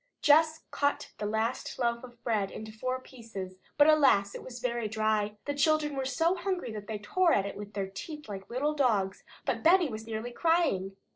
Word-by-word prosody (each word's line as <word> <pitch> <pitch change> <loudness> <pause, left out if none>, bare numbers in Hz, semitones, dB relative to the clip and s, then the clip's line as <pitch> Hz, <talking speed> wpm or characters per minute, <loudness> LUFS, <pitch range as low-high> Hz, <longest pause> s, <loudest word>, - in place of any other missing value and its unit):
Jess 315 +1 +5
cut 285 0 0
the 210 - -1
last 220 +3 -2
loaf 235 -1 0
of 240 -2 -13
bread 210 -4 0
into 220 0 -8
four 255 +4 -3
pieces, 210 -8 -9 0.2
but 290 - +7
alas! 280 -10 +5
it - - -7
was 245 -1 -9
very 235 -2 -1
dry. 215 -1 0
The 285 - -1
children 300 0 +2
were 270 -1 -2
so 325 +6 +2
hungry 370 -8 -2
that 210 -1 -7
they 220 - -3
tore 335 - +2
it 200 0 0
with 205 +1 -8
their 200 -1 -1
teeth 300 - -8
like 195 -2 -7
little 280 +5 0
dogs, 215 -9 +1 0.2
but - - -1
Benny 345 -1 +5
was 220 -1 -7
nearly 225 +2 -4
crying. 240 - +1
235 Hz, 195 wpm, -30 LUFS, 210-295 Hz, 0.2 s, but